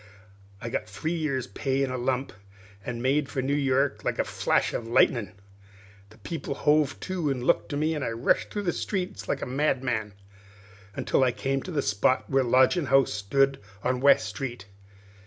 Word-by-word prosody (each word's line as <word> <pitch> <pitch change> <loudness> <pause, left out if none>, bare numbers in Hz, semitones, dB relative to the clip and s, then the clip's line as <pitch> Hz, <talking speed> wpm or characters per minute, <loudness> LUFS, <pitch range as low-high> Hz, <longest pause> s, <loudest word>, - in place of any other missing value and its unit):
I 115 - -5
got - - -1
my - - -23
three 110 - -3
years' 150 -6 -1
pay 135 -1 -1
in 135 - -1
a - - -2
lump, 130 0 -1 0.5
an' 120 0 -5
made 140 +2 +1
for 130 -3 -2
New 140 +2 0
York 140 0 +1
like - - -1
a - - +2
flash - - 0
of 115 - -4
lightnin'. 115 -2 +2 0.8
The 110 - -18
people 140 +4 -5
hove 150 -1 +2
to 180 -5 -2
and 130 -3 -2
looked - - +1
at 145 - -2
me, 155 +2 +1
as 150 - -3
I 135 - -1
rushed 115 +2 +1
through 205 - -4
the 175 - 0
streets 190 -1 -3
like - - -2
a - - -1
madman, 125 -6 -1 0.8
until - - +1
I 130 - +3
came 135 +3 -2
to 185 - -7
the 145 -4 0
spot 105 +5 +1
where 135 -1 +2
the 125 - -2
lodgin' 130 +6 +4
house 135 -3 +4
stood 135 +7 +1 0.2
on 125 0 0
West 135 -6 +5
Street. 120 0 -5
135 Hz, 195 wpm, -27 LUFS, 120-145 Hz, 0.8 s, West